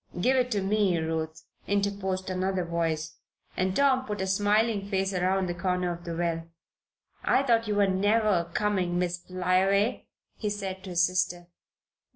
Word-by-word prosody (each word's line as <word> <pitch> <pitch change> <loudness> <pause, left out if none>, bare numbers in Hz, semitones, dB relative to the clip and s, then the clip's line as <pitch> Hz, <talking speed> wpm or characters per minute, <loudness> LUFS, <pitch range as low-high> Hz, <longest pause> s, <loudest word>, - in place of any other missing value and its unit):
"Give 255 +9 +3
it 250 -1 +2
to 205 -5 0
me, 200 -3 +2
Ruth," 160 0 -3 0.2
interposed 200 -2 -1
another 185 0 -1
voice, 165 -2 -2 0.4
and 185 0 0
Tom 270 -2 +3
put 210 -5 -5
a 190 - 0
smiling 205 +1 +1
face 195 -1 0
around 185 +1 +1
the 175 - -2
corner 180 0 -1
of 170 0 -11
the 170 -1 -4
well. 165 -1 -1 0.8
"I 275 - +3
thought 230 -4 +2
you 210 - 0
were 205 0 +4
never 200 -2 +2
coming, 185 -3 0
Miss 175 0 -1
Flyaway," 185 +4 +1 0.3
he 210 - -2
said, 195 -2 -4
to - - -7
his 175 0 +2
sister. 180 -1 -1
190 Hz, 165 wpm, -28 LUFS, 175-205 Hz, 0.8 s, were